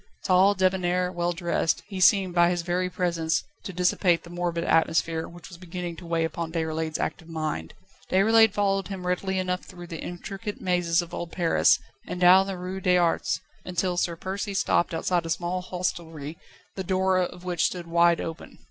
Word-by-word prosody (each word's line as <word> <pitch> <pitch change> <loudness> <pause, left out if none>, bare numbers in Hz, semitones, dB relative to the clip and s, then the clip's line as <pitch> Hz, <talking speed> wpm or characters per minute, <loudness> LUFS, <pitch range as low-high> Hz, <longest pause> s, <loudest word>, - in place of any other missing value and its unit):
Tall, 190 +2 +4
débonnair, 180 -1 +1
well 175 0 0
dressed, 170 -2 0
he 195 -2 -6
seemed 190 -1 +4
by 175 0 +5
his 175 -1 -1
very 180 +1 -1
presence 170 -3 0 0.2
to - - -4
dissipate 180 -1 +2
the 170 - -12
morbid 175 -1 -2
atmosphere 160 0 +1
which 175 -1 -12
was 175 -2 -12
beginning 175 -1 -5
to 175 - -10
weigh 165 -1 +1
upon 165 0 -4
Déroulède's 160 -1 -2
active 165 - -4
mind. 155 - -4 0.3
Déroulède 220 +3 +5
followed 195 -2 0
him 190 -2 -6
readily 190 +1 -1
enough 180 0 -1
through 175 -2 -11
the 165 -2 -7
intricate 195 +4 -6
mazes 175 -2 +1
of 170 - -12
old 170 -1 -5
Paris, 170 -2 +3 0.3
and 180 - -4
down 185 +2 +7
the 195 -1 -4
Rue 185 +2 -5
des 180 0 +3
Arts, 170 -2 +1 0.2
until 180 0 -1
Sir 175 -1 0
Percy 195 +3 -4
stopped 175 -2 +1
outside 175 +1 0
a 165 - -6
small 175 +2 -1
hostelry, 165 -4 -4 0.4
the 190 - -3
door 185 0 +2
of 180 0 -3
which 180 -2 0
stood 175 -2 -2
wide 170 0 +3
open. 165 0 -7
175 Hz, 185 wpm, -26 LUFS, 170-185 Hz, 0.4 s, down